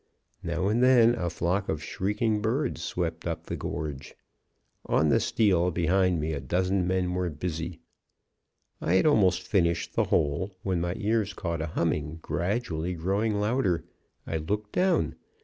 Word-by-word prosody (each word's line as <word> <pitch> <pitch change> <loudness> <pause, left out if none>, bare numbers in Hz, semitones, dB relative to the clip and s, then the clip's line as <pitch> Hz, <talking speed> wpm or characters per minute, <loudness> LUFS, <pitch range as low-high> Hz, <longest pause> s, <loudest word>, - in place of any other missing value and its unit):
Now 95 - -1
and 110 +4 +2
then 125 -2 +6
a 90 -8 -2
flock 90 +4 -1
of 75 -1 -2
shrieking 105 +5 -1
birds 125 +6 -1
swept 85 -1 -3
up 85 - -4
the - - -4
gorge. 75 -3 -5 0.7
On 75 - +3
the - - +4
steel 90 -5 +2
behind 90 +1 +2
me 80 +1 -1
a 70 - -2
dozen 90 +6 0
men 90 -1 0
were 90 -1 -1
busy. 85 +1 -4 1.0
"I 85 - +1
had 95 - +4
almost 95 - +4
finished 85 -4 +1
the - - +2
hole, 95 +7 0
when 95 -3 0
my 85 +1 -1
ears 110 -2 0
caught 85 -3 -3
a 80 - -2
humming, 80 -1 -1
gradually 90 -3 -2
growing 100 +6 0
louder. 105 -7 +1 0.4
I 80 - -2
looked 105 +7 -3
down. 185 +1 +1
90 Hz, 155 wpm, -27 LUFS, 85-105 Hz, 1.0 s, then